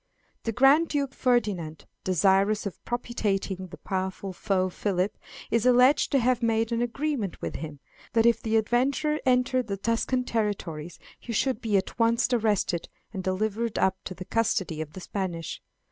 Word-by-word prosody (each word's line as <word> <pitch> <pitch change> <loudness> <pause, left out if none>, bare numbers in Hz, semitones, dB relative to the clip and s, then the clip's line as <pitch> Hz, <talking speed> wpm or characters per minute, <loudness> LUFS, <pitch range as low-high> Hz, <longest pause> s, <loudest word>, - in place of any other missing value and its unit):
The 225 - 0
Grand 270 +8 +5
Duke 280 -3 -1
Ferdinand, 205 - 0 0.2
desirous 195 +4 +3
of 200 - -6
propitiating 210 -5 -1
his - - -11
powerful 190 0 -3
foe 185 0 0
Philip, 185 +1 -1 0.4
is 230 -1 +2
alleged 250 +3 +5
to 280 - +4
have 250 0 +2
made 225 0 +1
an 235 0 0
agreement 240 - -2
with - - -4
him, 150 -3 -7 0.3
that 225 -1 +4
if 235 -1 +4
the 225 0 +1
adventurer 265 +7 +1
entered 250 -1 +2
the 200 -1 -3
Tuscan 230 +4 0
territories 190 -9 -3 0.2
he 240 - -7
should 260 +1 0
be 215 -3 +2
at 190 - -3
once 235 +2 +3
arrested 210 -7 +1 0.2
and 190 -2 -4
delivered 215 +4 -1
up 190 0 +1
to 185 - -5
the 185 - -8
custody 190 -8 0
of 155 -1 -7
the 185 - -8
Spanish. 175 -4 -4
220 Hz, 160 wpm, -27 LUFS, 190-240 Hz, 0.4 s, Grand